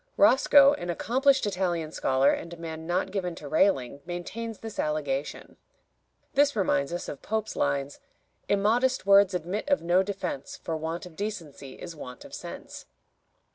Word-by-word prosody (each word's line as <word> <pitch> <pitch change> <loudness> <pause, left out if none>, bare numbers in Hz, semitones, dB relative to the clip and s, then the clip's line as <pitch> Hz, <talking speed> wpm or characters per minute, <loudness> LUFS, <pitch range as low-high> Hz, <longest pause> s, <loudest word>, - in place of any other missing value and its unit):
Roscoe, 280 -1 +6
an 175 - -5
accomplished 265 - +2
Italian 175 -5 -1
scholar 135 -3 +3
and 170 - -4
a 170 - -8
man 160 -1 -7
not 180 +2 0
given 180 -3 -2
to 150 - -9
railing, 140 -5 +1
maintains 205 +7 -5
this 225 -1 -8
allegation. 145 -2 -2 0.8
This 285 +1 +3
reminds 175 -8 +1
us 175 - -4
of 140 - -7
Pope's 220 0 -2
lines: 140 0 -1 0.5
"Immodest 225 +5 +2
words 200 -1 +6
admit 180 - -3
of 285 - +2
no 175 +2 +4
defense, 190 -8 -4
For 165 - -4
want 160 +2 -4
of 175 -3 -12
decency 165 -10 -6
is 170 -2 -9
want 125 -4 -9
of - - -13
sense." - - -8
180 Hz, 155 wpm, -27 LUFS, 155-210 Hz, 0.8 s, Roscoe